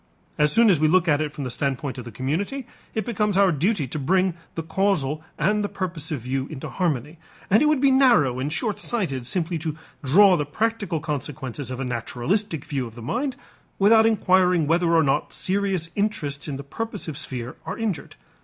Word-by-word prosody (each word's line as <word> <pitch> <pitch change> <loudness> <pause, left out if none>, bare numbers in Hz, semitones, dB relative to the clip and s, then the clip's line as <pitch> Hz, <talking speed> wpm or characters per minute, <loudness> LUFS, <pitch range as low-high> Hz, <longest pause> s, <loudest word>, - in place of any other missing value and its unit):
As 150 0 +4
soon 230 -1 +5
as 170 - +3
we 155 - +4
look 180 +2 +3
at 150 -2 +3
it 150 -1 -2
from 145 - -6
the 125 - -4
standpoint 135 +1 -2
of 120 - -8
the 120 - -8
community, 180 - -2 0.3
it 220 - -1
becomes 210 -4 0
our 195 -2 +5
duty 165 - 0
to 155 - -4
bring 185 +6 +2 0.2
the 165 - -3
causal 160 -5 0
and 210 +1 +1
the 205 - -2
purposive 165 -6 -4
view 130 +2 -2
into 150 -5 -7
harmony, 155 -3 -2 0.3
and 215 - +6
it 300 - +4
would 305 -2 +3
be 275 0 +4
narrow 235 - +4
and 140 +3 -2
short 215 +6 -1
sighted 140 - -1
simply 170 +1 -1
to 155 -1 -4 0.3
draw 185 +8 +6
the 150 - 0
practical 210 -1 -1
consequences 145 -3 -4
of 130 0 -5
a 135 - -2
naturalistic 140 - -2
view 135 -4 -2
of 115 - -13
the 120 - -9
mind 255 - -2 0.4
without 220 +3 +6
inquiring 185 -5 +3
whether 170 +2 +2
or 165 -1 +5
not 135 -1 0
serious 190 -4 0
interests 165 -10 -2
in 140 -3 -4
the 140 - -7
purposive 200 0 -5
sphere 125 -2 -6
are - - -4
injured. 210 -10 -3
165 Hz, 200 wpm, -24 LUFS, 140-200 Hz, 0.4 s, and